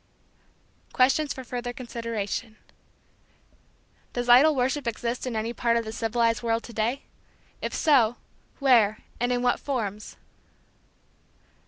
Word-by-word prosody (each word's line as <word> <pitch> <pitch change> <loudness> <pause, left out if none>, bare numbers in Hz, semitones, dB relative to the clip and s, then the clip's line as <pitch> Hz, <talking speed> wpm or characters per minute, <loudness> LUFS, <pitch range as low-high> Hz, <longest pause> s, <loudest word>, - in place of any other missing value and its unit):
Questions 275 +3 +3
for 260 - -6
Further 245 0 -5
Consideration. 230 -3 -5 1.6
Does 245 0 -3
idol 285 +6 +7
worship 260 +1 0
exist 235 +2 -3
in 245 - -3
any 220 +2 -2
part 235 0 +1
of 230 - -2
the 220 - -5
civilized 230 0 0
world 230 -1 0
to 235 - -10
day? 230 +6 -1 0.6
If - - -3
so, 250 -8 +4 0.4
where 230 -6 +3 0.2
and 245 +1 0
in 245 0 0
what 245 - +2
forms? 215 -7 -4
240 Hz, 125 wpm, -26 LUFS, 225-255 Hz, 1.6 s, idol